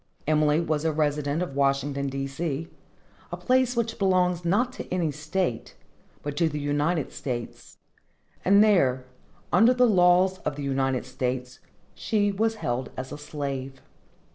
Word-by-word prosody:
Emily 150 Hz, 0 st, +3 dB
was 155 Hz, -3 st, -1 dB
a 160 Hz, -, +1 dB
resident 150 Hz, +1 st, 0 dB
of 155 Hz, -7 st, -6 dB
Washington, 140 Hz, 0 st, 0 dB
D. 135 Hz, 0 st, -3 dB
C., 150 Hz, +2 st, -3 dB, 0.6 s
a -, -, -4 dB
place 255 Hz, -1 st, +2 dB
which 230 Hz, -1 st, -2 dB
belongs 180 Hz, -2 st, +2 dB
not 225 Hz, +9 st, +1 dB
to -, -, -8 dB
any 175 Hz, -4 st, 0 dB
state, 155 Hz, -3 st, -3 dB, 0.5 s
but 145 Hz, -1 st, -4 dB
to 165 Hz, -2 st, +2 dB
the 150 Hz, -1 st, -4 dB
United 145 Hz, +2 st, 0 dB
States; 120 Hz, -3 st, -6 dB, 0.7 s
and 200 Hz, +2 st, +6 dB
there, 135 Hz, -12 st, +3 dB, 0.5 s
under 240 Hz, +3 st, +5 dB
the 250 Hz, 0 st, +5 dB
laws 185 Hz, -2 st, +4 dB
of 145 Hz, -, -3 dB
the 145 Hz, -, -6 dB
United 135 Hz, -2 st, 0 dB
States, 125 Hz, -1 st, -4 dB, 0.3 s
she 205 Hz, -2 st, 0 dB
was 220 Hz, +3 st, 0 dB
held 125 Hz, -, -3 dB
as 130 Hz, 0 st, -5 dB
a -, -, -6 dB
slave. 135 Hz, -3 st, -5 dB
150 Hz, 150 wpm, -26 LUFS, 135-185 Hz, 0.7 s, and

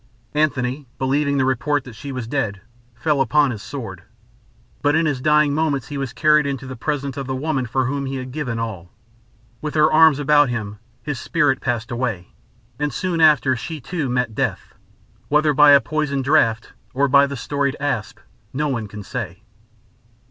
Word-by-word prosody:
Antony, 140 Hz, -2 st, 0 dB
believing 140 Hz, +2 st, +1 dB
the 130 Hz, -, +2 dB
report 140 Hz, +2 st, 0 dB
that 125 Hz, -, -11 dB
she 140 Hz, +6 st, -8 dB
was 130 Hz, -3 st, -4 dB
dead, 115 Hz, -7 st, -2 dB, 0.3 s
fell 145 Hz, +3 st, +1 dB
upon 145 Hz, 0 st, +3 dB
his 110 Hz, -4 st, -6 dB
sword; -, -, -7 dB, 0.8 s
but 145 Hz, +1 st, +2 dB
in 160 Hz, +1 st, +2 dB
his 145 Hz, -4 st, -1 dB
dying 150 Hz, 0 st, +3 dB
moments 145 Hz, -5 st, -1 dB
he 145 Hz, -, -5 dB
was 135 Hz, -3 st, -3 dB
carried 150 Hz, -2 st, +3 dB
into 135 Hz, -1 st, -4 dB
the 130 Hz, 0 st, -7 dB
presence 140 Hz, +2 st, -3 dB
of 135 Hz, -2 st, -4 dB
the 130 Hz, -, -2 dB
woman 135 Hz, -2 st, -1 dB
for 130 Hz, +2 st, 0 dB
whom 140 Hz, +1 st, -2 dB
he 135 Hz, -, -4 dB
had 130 Hz, -1 st, -6 dB
given 125 Hz, -5 st, -3 dB
all. 105 Hz, -7 st, -5 dB, 0.7 s
With 150 Hz, 0 st, -4 dB
her 155 Hz, 0 st, +4 dB
arms 160 Hz, -2 st, +6 dB
about 145 Hz, -1 st, +4 dB
him, 105 Hz, -4 st, -4 dB, 0.2 s
his 145 Hz, -4 st, -4 dB
spirit 145 Hz, -4 st, +1 dB
passed 120 Hz, -2 st, -2 dB
away; 115 Hz, -7 st, -3 dB, 0.5 s
and 150 Hz, 0 st, -1 dB
soon 170 Hz, +4 st, -2 dB
after 150 Hz, -4 st, +5 dB
she, 155 Hz, +6 st, -6 dB
too, 145 Hz, +1 st, -3 dB
met 125 Hz, -2 st, -1 dB
death, -, -, -3 dB, 0.5 s
whether 150 Hz, 0 st, +3 dB
by 150 Hz, +1 st, +6 dB
a 140 Hz, -1 st, +8 dB
poisoned 145 Hz, -2 st, -2 dB
draught 115 Hz, -6 st, +2 dB, 0.2 s
or 140 Hz, +2 st, +3 dB
by 140 Hz, +1 st, +5 dB
the 140 Hz, -1 st, -5 dB
storied 140 Hz, +2 st, -1 dB
asp 135 Hz, -7 st, -2 dB, 0.3 s
no 150 Hz, +3 st, -1 dB
one 115 Hz, -5 st, -2 dB
can 105 Hz, +1 st, -9 dB
say. 100 Hz, -2 st, -6 dB
140 Hz, 185 wpm, -21 LUFS, 125-150 Hz, 0.8 s, a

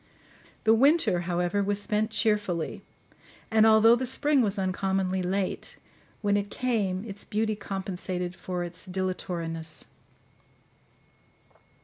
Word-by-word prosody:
The 220 Hz, -, +5 dB
winter, 275 Hz, -, +4 dB
however, 175 Hz, +3 st, 0 dB
was 200 Hz, 0 st, 0 dB
spent 215 Hz, +1 st, 0 dB
cheerfully; 210 Hz, -7 st, 0 dB, 0.7 s
and 220 Hz, 0 st, +5 dB
although 220 Hz, +1 st, +7 dB
the 255 Hz, +1 st, -2 dB
spring 285 Hz, +2 st, +2 dB
was 205 Hz, -3 st, 0 dB
uncommonly 190 Hz, 0 st, 0 dB
late, 185 Hz, +1 st, -2 dB, 0.5 s
when 205 Hz, 0 st, +2 dB
it 205 Hz, 0 st, -1 dB
came 210 Hz, -6 st, -1 dB
its 205 Hz, -2 st, -7 dB
beauty 215 Hz, 0 st, -1 dB
compensated 185 Hz, -2 st, -4 dB
for 180 Hz, -1 st, -4 dB
its 175 Hz, 0 st, -7 dB
dilatoriness. 170 Hz, -4 st, -4 dB
195 Hz, 110 wpm, -27 LUFS, 185-220 Hz, 0.7 s, although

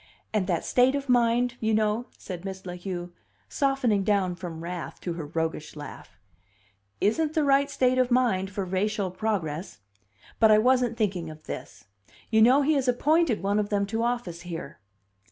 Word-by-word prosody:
And 205 Hz, -4 st, +1 dB
that 170 Hz, -4 st, -1 dB
state 255 Hz, +2 st, +3 dB
of 280 Hz, -1 st, -4 dB
mind, 245 Hz, 0 st, +2 dB
you 220 Hz, -1 st, +1 dB
know," 215 Hz, +3 st, 0 dB
said 180 Hz, -2 st, -7 dB
Miss 190 Hz, -1 st, -7 dB
La 180 Hz, -, -5 dB
Heu, 175 Hz, -1 st, -5 dB, 0.4 s
softening 270 Hz, -8 st, +1 dB
down 190 Hz, -3 st, +1 dB
from 170 Hz, -2 st, -7 dB
wrath 175 Hz, 0 st, -6 dB
to 175 Hz, -, -3 dB
her 165 Hz, -3 st, -6 dB
roguish 160 Hz, -1 st, -3 dB
laugh, 150 Hz, -2 st, -10 dB, 0.8 s
"isn't 305 Hz, +9 st, +1 dB
the 310 Hz, -, +3 dB
right 280 Hz, 0 st, +3 dB
state 255 Hz, -2 st, +2 dB
of 255 Hz, -1 st, +3 dB
mind 235 Hz, -7 st, +2 dB
for 200 Hz, 0 st, -3 dB
racial 190 Hz, +1 st, -1 dB
progress! 180 Hz, -, -3 dB, 0.6 s
But 220 Hz, -, +6 dB
I 215 Hz, -, +7 dB
wasn't 245 Hz, 0 st, +2 dB
thinking 185 Hz, -7 st, -1 dB
of 155 Hz, 0 st, -11 dB
this. -, -, -8 dB, 0.5 s
You 220 Hz, -1 st, +4 dB
know 260 Hz, +5 st, +6 dB
he 310 Hz, +3 st, +3 dB
has 275 Hz, -3 st, 0 dB
appointed 280 Hz, -, +2 dB
one 200 Hz, +2 st, +1 dB
of 205 Hz, -1 st, -1 dB
them 200 Hz, -1 st, +1 dB
to 225 Hz, +3 st, -2 dB
office 235 Hz, -8 st, -2 dB
here." 170 Hz, -7 st, -7 dB
210 Hz, 175 wpm, -27 LUFS, 180-245 Hz, 0.8 s, I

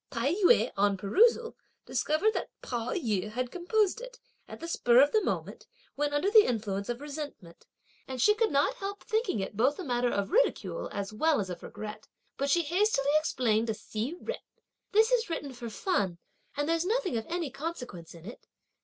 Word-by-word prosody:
Tai 260 Hz, +5 st, 0 dB
yü, 405 Hz, +4 st, +4 dB
on 200 Hz, 0 st, +2 dB
perusal, 460 Hz, -, +3 dB, 0.3 s
discovered 350 Hz, +9 st, +1 dB
that -, -, -3 dB
Pao 240 Hz, -1 st, -3 dB
yü 210 Hz, -, -1 dB
had 250 Hz, +3 st, -3 dB
composed 410 Hz, +4 st, +1 dB
it, -, -, -10 dB, 0.3 s
at -, -, -9 dB
the 335 Hz, -, -6 dB
spur 245 Hz, -7 st, +4 dB
of 285 Hz, +2 st, +6 dB
the 435 Hz, -, +2 dB
moment, -, -, -3 dB, 0.3 s
when 290 Hz, +1 st, -1 dB
under 290 Hz, +8 st, +1 dB
the 435 Hz, -1 st, +9 dB
influence 205 Hz, -3 st, -2 dB
of 240 Hz, +2 st, -3 dB
resentment; 285 Hz, -, -8 dB, 0.4 s
and 260 Hz, -1 st, -5 dB
she 420 Hz, -, +5 dB
could 440 Hz, +1 st, +1 dB
not 285 Hz, -1 st, +2 dB
help 400 Hz, +1 st, -5 dB
thinking 435 Hz, -, 0 dB
it 190 Hz, -, -5 dB
both 260 Hz, +7 st, +2 dB
a 375 Hz, -, -5 dB
matter 245 Hz, -4 st, 0 dB
of 200 Hz, +1 st, -2 dB
ridicule -, -, +1 dB
as 200 Hz, +1 st, -4 dB
well 310 Hz, +6 st, +2 dB
as 190 Hz, -3 st, -3 dB
of 175 Hz, -, -7 dB
regret; 215 Hz, 0 st, -8 dB, 0.3 s
but 280 Hz, +1 st, -1 dB
she 340 Hz, +4 st, +3 dB
hastily 335 Hz, -3 st, +2 dB
explained 230 Hz, -7 st, +1 dB
to 220 Hz, -, -1 dB
Hsi 220 Hz, +8 st, -4 dB
Jen: 485 Hz, -, -3 dB, 0.5 s
"This 440 Hz, +2 st, +4 dB
is 485 Hz, -4 st, +2 dB
written 285 Hz, -5 st, -4 dB
for 240 Hz, -1 st, -7 dB
fun, 205 Hz, -, -1 dB, 0.4 s
and 290 Hz, 0 st, 0 dB
there's 330 Hz, 0 st, +1 dB
nothing 400 Hz, -, 0 dB
of 225 Hz, -1 st, -3 dB
any 335 Hz, -5 st, -2 dB
consequence 250 Hz, -, -6 dB
in 165 Hz, 0 st, -13 dB
it!" 235 Hz, -, -11 dB
285 Hz, 190 wpm, -29 LUFS, -, 0.5 s, the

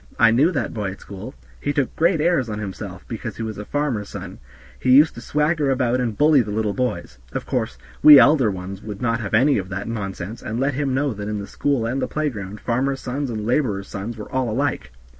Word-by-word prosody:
I 110 Hz, -, +6 dB
knew 140 Hz, +10 st, +4 dB
that -, -, -2 dB
boy 105 Hz, -4 st, -2 dB
at -, -, -14 dB
school; 100 Hz, -3 st, -9 dB, 0.2 s
he 145 Hz, -, -1 dB
took 140 Hz, -3 st, -1 dB
great 170 Hz, +1 st, +2 dB
airs 155 Hz, -6 st, +2 dB
on 105 Hz, -, -3 dB
himself 100 Hz, -2 st, -7 dB
because 110 Hz, -1 st, -6 dB
he 115 Hz, -, -4 dB
was 110 Hz, -2 st, -5 dB
a 105 Hz, -, -6 dB
farmer's 135 Hz, -8 st, -2 dB
son; -, -, -8 dB, 0.4 s
he 130 Hz, -, -1 dB
used 145 Hz, +5 st, +7 dB
to 115 Hz, -, -9 dB
swagger 150 Hz, +2 st, +1 dB
about 125 Hz, -1 st, +1 dB
and 115 Hz, -4 st, -2 dB
bully 150 Hz, -2 st, +5 dB
the 105 Hz, -, -5 dB
little 105 Hz, 0 st, -1 dB
boys. 125 Hz, -, -3 dB
Of -, -, -3 dB
course, -, -, -2 dB, 0.2 s
we 150 Hz, -1 st, +11 dB
elder 140 Hz, -5 st, +6 dB
ones 95 Hz, 0 st, -6 dB
would 105 Hz, -2 st, -7 dB
not 115 Hz, 0 st, 0 dB
have 110 Hz, -1 st, -1 dB
any 135 Hz, +2 st, +4 dB
of 95 Hz, -1 st, -6 dB
that 100 Hz, +2 st, -4 dB
nonsense, 100 Hz, -2 st, -5 dB
and 110 Hz, +2 st, -4 dB
let 135 Hz, +2 st, +1 dB
him 135 Hz, -1 st, -1 dB
know 140 Hz, -1 st, 0 dB
that 105 Hz, 0 st, -6 dB
in 105 Hz, -, -2 dB
the 100 Hz, -, -5 dB
school 135 Hz, +1 st, -1 dB
and 130 Hz, +4 st, -1 dB
the -, -, 0 dB
playground 105 Hz, -10 st, -3 dB
farmers' 135 Hz, +3 st, 0 dB
sons 135 Hz, +2 st, -3 dB
and 110 Hz, -3 st, -4 dB
laborers' 110 Hz, -6 st, 0 dB
sons 105 Hz, +4 st, -5 dB
were 105 Hz, -, -9 dB
all 130 Hz, -2 st, 0 dB
alike. 125 Hz, -, -1 dB
115 Hz, 235 wpm, -22 LUFS, 105-140 Hz, 0.4 s, we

